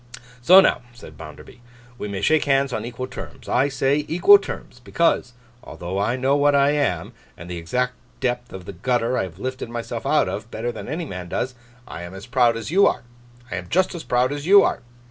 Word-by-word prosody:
'So 180 +10 +8
now,' - - +2
said 120 - -13
Bounderby, 120 - -12 0.4
'we - - -4
may 100 -1 -5
shake 155 +8 +2
hands 135 -2 +2
on 110 -1 -3
equal 120 +1 -5
terms. - - -10
I 130 +3 +2
say, 140 +1 0
equal 400 - +6
terms, - - -8
because 165 -7 +1 0.3
although 90 +3 -5
I 110 +5 0
know 130 +2 +1
what 145 0 +3
I 140 0 +4
am, 140 - -1 0.2
and 85 - -10
the 90 -1 -5
exact 125 +10 -1 0.3
depth 120 -1 -2
of 95 -2 -9
the 100 - -8
gutter 120 +5 0
I - - +1
have 90 -3 -6
lifted 130 +2 -5
myself 120 0 -5
out - - +3
of, - - -5
better 120 +2 -3
than - - -9
any 165 +3 -4
man 90 - -7
does, 130 +7 -2 0.3
I - - -8
am 85 +2 -8
as 95 - -9
proud 120 -2 +2
as 115 +6 -6
you 200 +3 +5
are. - - -1 0.5
I - - -2
am 90 -1 -7
just 185 +2 +1
as 170 - -7
proud 125 +2 +1
as 145 +2 -6
you 200 +1 +8
are. - - -1
125 Hz, 220 wpm, -22 LUFS, 105-145 Hz, 0.5 s, So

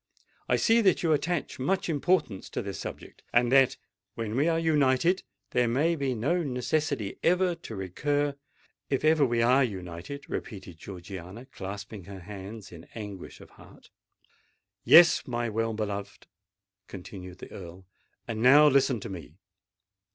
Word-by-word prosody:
I - - +4
see 230 0 +4
that 190 -5 +3
you 160 -2 +3
attach 160 -1 -2
much 190 +9 0
importance 150 - 0
to - - -4
this - - -6
subject—and 120 0 -2
that, 135 -1 +5 0.4
when 115 -1 -4
we 145 +5 +2
are 165 -1 +2
united, 160 +2 +2 0.3
there 125 -1 +2
may 150 +8 +2
be 135 -4 -1
no 150 +11 0
necessity 135 -4 -2
ever 180 +1 +3
to 165 -9 -9
recur——" 145 +10 -1 0.6
"If 135 +2 0
ever 155 -1 +5
we 120 -3 +2
are 130 +3 +5
united!" 95 +4 -6
repeated 95 -5 -7
Georgiana, 95 +4 -9
clasping 100 -4 -8
her 95 -1 -9
hands 100 +3 -9
in 85 -1 -12
anguish 105 -4 -8
of - - -15
heart. - - -18 0.9
"Yes, 170 0 +7
my 120 -2 -2
well 115 +1 -1
beloved," 100 -2 -5 0.6
continued 90 -1 -9
the - - -11
Earl. 90 0 -10 0.4
"And 110 -1 -4
now 145 +5 +7
listen 135 -3 +3
to 115 - -6
me. 85 -5 -9
120 Hz, 145 wpm, -28 LUFS, 100-150 Hz, 0.9 s, Yes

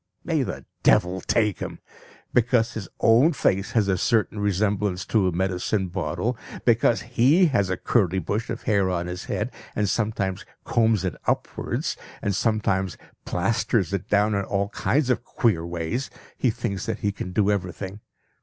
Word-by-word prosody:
May - - +1
the - - -4 0.2
devil 90 +2 +3
take 105 -5 +1
him! - - -5 0.6
Because 120 -1 +3
his 110 -4 -6
own 125 +9 +5
face 100 -7 0
has 110 -4 +3
a 95 -2 +1
certain 110 0 +1
resemblance 100 -2 0
to 105 -5 +2
a - - +1
medicine 95 +2 -1
bottle, 95 +7 -2 0.3
because 115 -3 +3
he 130 +10 +4
has 100 -6 +2
a 95 - -1
curly 95 -6 +1
bush 105 +6 -2
of - - -4
hair 100 -5 +2
on 90 -1 -1
his 90 +1 -5
head, - - -2 0.2
and 105 - +1
sometimes 100 -3 -1 0.2
combs 110 -4 +2
it 90 - -1
upwards, - - -1 0.2
and 100 - -1
sometimes 95 -4 0 0.3
plasters 100 0 0
it 100 -1 -3
down 105 +1 +3
in 100 0 0
all 100 0 -1
kinds 130 +4 +1
of 120 - 0
queer 105 -11 +1
ways, 85 +10 -3 0.3
he 130 - +1
thinks 100 -3 -3
that - - -3
he 100 - +1
can 90 -2 -6
do 105 +1 +2
everything. 95 0 -3
100 Hz, 165 wpm, -24 LUFS, 95-115 Hz, 0.6 s, own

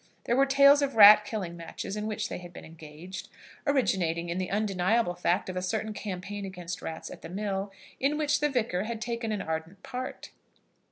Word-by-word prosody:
There 240 - +1
were 275 +1 +4
tales 280 +1 +6
of 280 -3 -1
rat 210 0 +9
killing 195 -6 -4
matches 170 +3 -6
in 210 0 -3
which 215 0 -2
they - - -5
had 175 -1 -11
been - - -11
engaged, 160 +3 -10 0.4
originating 175 - +1
in 175 +2 -2
the 185 - -2
undeniable 200 0 +1
fact 175 +2 0
of 185 - -5
a 185 - -1
certain 215 +3 -2
campaign 200 0 -5
against 180 -2 -6
rats 160 0 -6
at - - -10
the - - -9
mill, 195 +1 -3 0.3
in 285 +3 +1
which 295 -1 +1
the 295 0 +2
Vicar 220 -8 -1
had 230 0 -4
taken 235 -1 -3
an 210 -2 -2
ardent 160 +4 -5
part. 255 0 -6
200 Hz, 200 wpm, -28 LUFS, 180-235 Hz, 0.4 s, rat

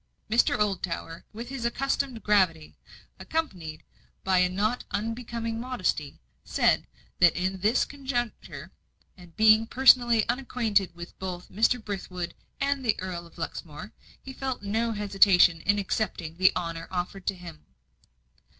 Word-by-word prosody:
Mr. 235 - +3
Oldtower, 185 -5 -2
with 235 +3 -8
his 270 -3 -5
accustomed 260 -1 -1
gravity, 185 -7 +2 0.4
accompanied 180 - -4 0.4
by 190 -1 +3
a 180 0 +3
not 210 +6 -1
unbecoming 230 +1 -3
modesty, 195 - -2 0.2
said, - - +2 0.3
that 175 -2 +6
in 185 +2 -2
this 215 +6 +2
conjuncture, 260 -4 -5 0.4
and 175 -1 -16
being 220 +1 +6
personally 240 -3 +5
unacquainted 230 -7 0
with 175 +1 -10
both 180 -2 -6
Mr. 225 +4 +2
Brithwood 185 -4 -5 0.3
and 280 -1 0
the 225 -4 +1
Earl 175 -2 -5
of 170 - -21
Luxmore, 165 +4 -7 0.3
he 265 - -10
felt 260 -4 -4
no 225 +3 0
hesitation 195 -5 +4
in 205 0 +4
accepting 185 -5 -2
the 185 +1 +5
honour 165 -2 -4
offered 180 +1 -4
to 195 - +1
him. 175 - -12
205 Hz, 130 wpm, -27 LUFS, 180-235 Hz, 0.4 s, that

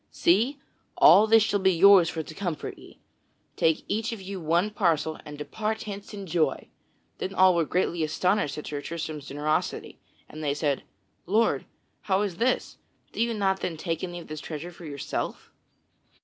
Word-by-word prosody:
See! 225 +11 +2 0.4
all 215 +2 +7
this 225 -1 +6
shall 205 -2 +1
be 190 0 +4
yours 185 -1 +7
for 160 - -4
to 155 - -10
comfort 175 -3 -4
ye! - - -15 0.6
Take 160 -1 +1
each 220 +2 -1
of 225 - -5
you 190 -1 -6
one 170 +6 +1
parcel 165 -6 0
and 150 0 -8
depart 215 +9 -3
hence 200 -1 -7
in 200 -2 -7
joy!" 160 -5 0 0.5
Then 195 - -4
all 185 0 +6
they - - 0
were 165 - +2
greatly 175 0 0
astonished 180 0 0
at 150 - -6
Sir 145 -1 -4
Tristram's 155 -3 -5
generosity, 150 +2 -2 0.3
and 155 +1 -9
they 145 -1 0
said: 145 -2 0 0.5
"Lord, 220 +5 +2 0.3
how 195 +1 +1
is 190 -5 -3
this? 250 +3 0 0.3
Do - - -3
you 235 -1 +1
not 190 -2 +1
then 165 -3 -3
take 165 0 -3
any 175 -1 -4
of 170 - -11
this 155 0 -6
treasure 165 +2 -6
for 170 0 -12
yourself?" 140 -2 -5
175 Hz, 180 wpm, -26 LUFS, 155-200 Hz, 0.6 s, all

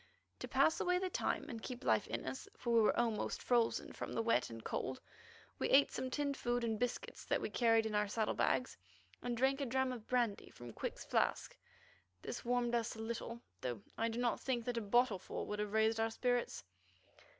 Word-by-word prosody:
To - - -5
pass 315 - +3
away 360 0 +2
the 370 0 -2
time 290 - 0
and 230 -6 -6
keep 250 +1 -6
life - - +3
in - - -3
us, 265 - -5
for 235 -1 -1
we 230 - +6
were 215 - +3
almost 230 -3 0
frozen 240 -2 +2
with - - -6
the 230 - +1
wet 230 - +2
and 115 -1 -8
cold, 130 0 -3 0.6
we - - 0
ate 275 +1 +6
some 260 - -3
tinned 285 +1 -1
food 240 -1 -1
and 220 -2 0
biscuits 245 0 -3
that - - +1
we - - -3
carried 225 -2 +4
in 220 - -2
our 210 0 +2
saddle 215 +1 0
bags, 255 - +1 0.4
and 245 -1 -2
drank 270 +3 +2
a - - +1
dram 265 +1 +1
of 235 -4 -7
brandy 240 -5 0
from 120 -2 -10
Quick's - - -5
flask. - - 0 0.7
This - - -5
warmed 240 0 +1
us 235 -1 0
a - - -10
little, 230 +1 -4 0.2
though 120 -5 -3
I 225 - +1
do 225 - -4
not 245 -1 +1
think 245 -3 -1
that 245 -1 -2
a - - +1
bottleful 215 -2 +1
would 210 0 -4
have 210 -1 -2
raised 220 +1 +3
our 225 0 +2
spirits. 245 +1 0
235 Hz, 210 wpm, -37 LUFS, 220-250 Hz, 0.7 s, we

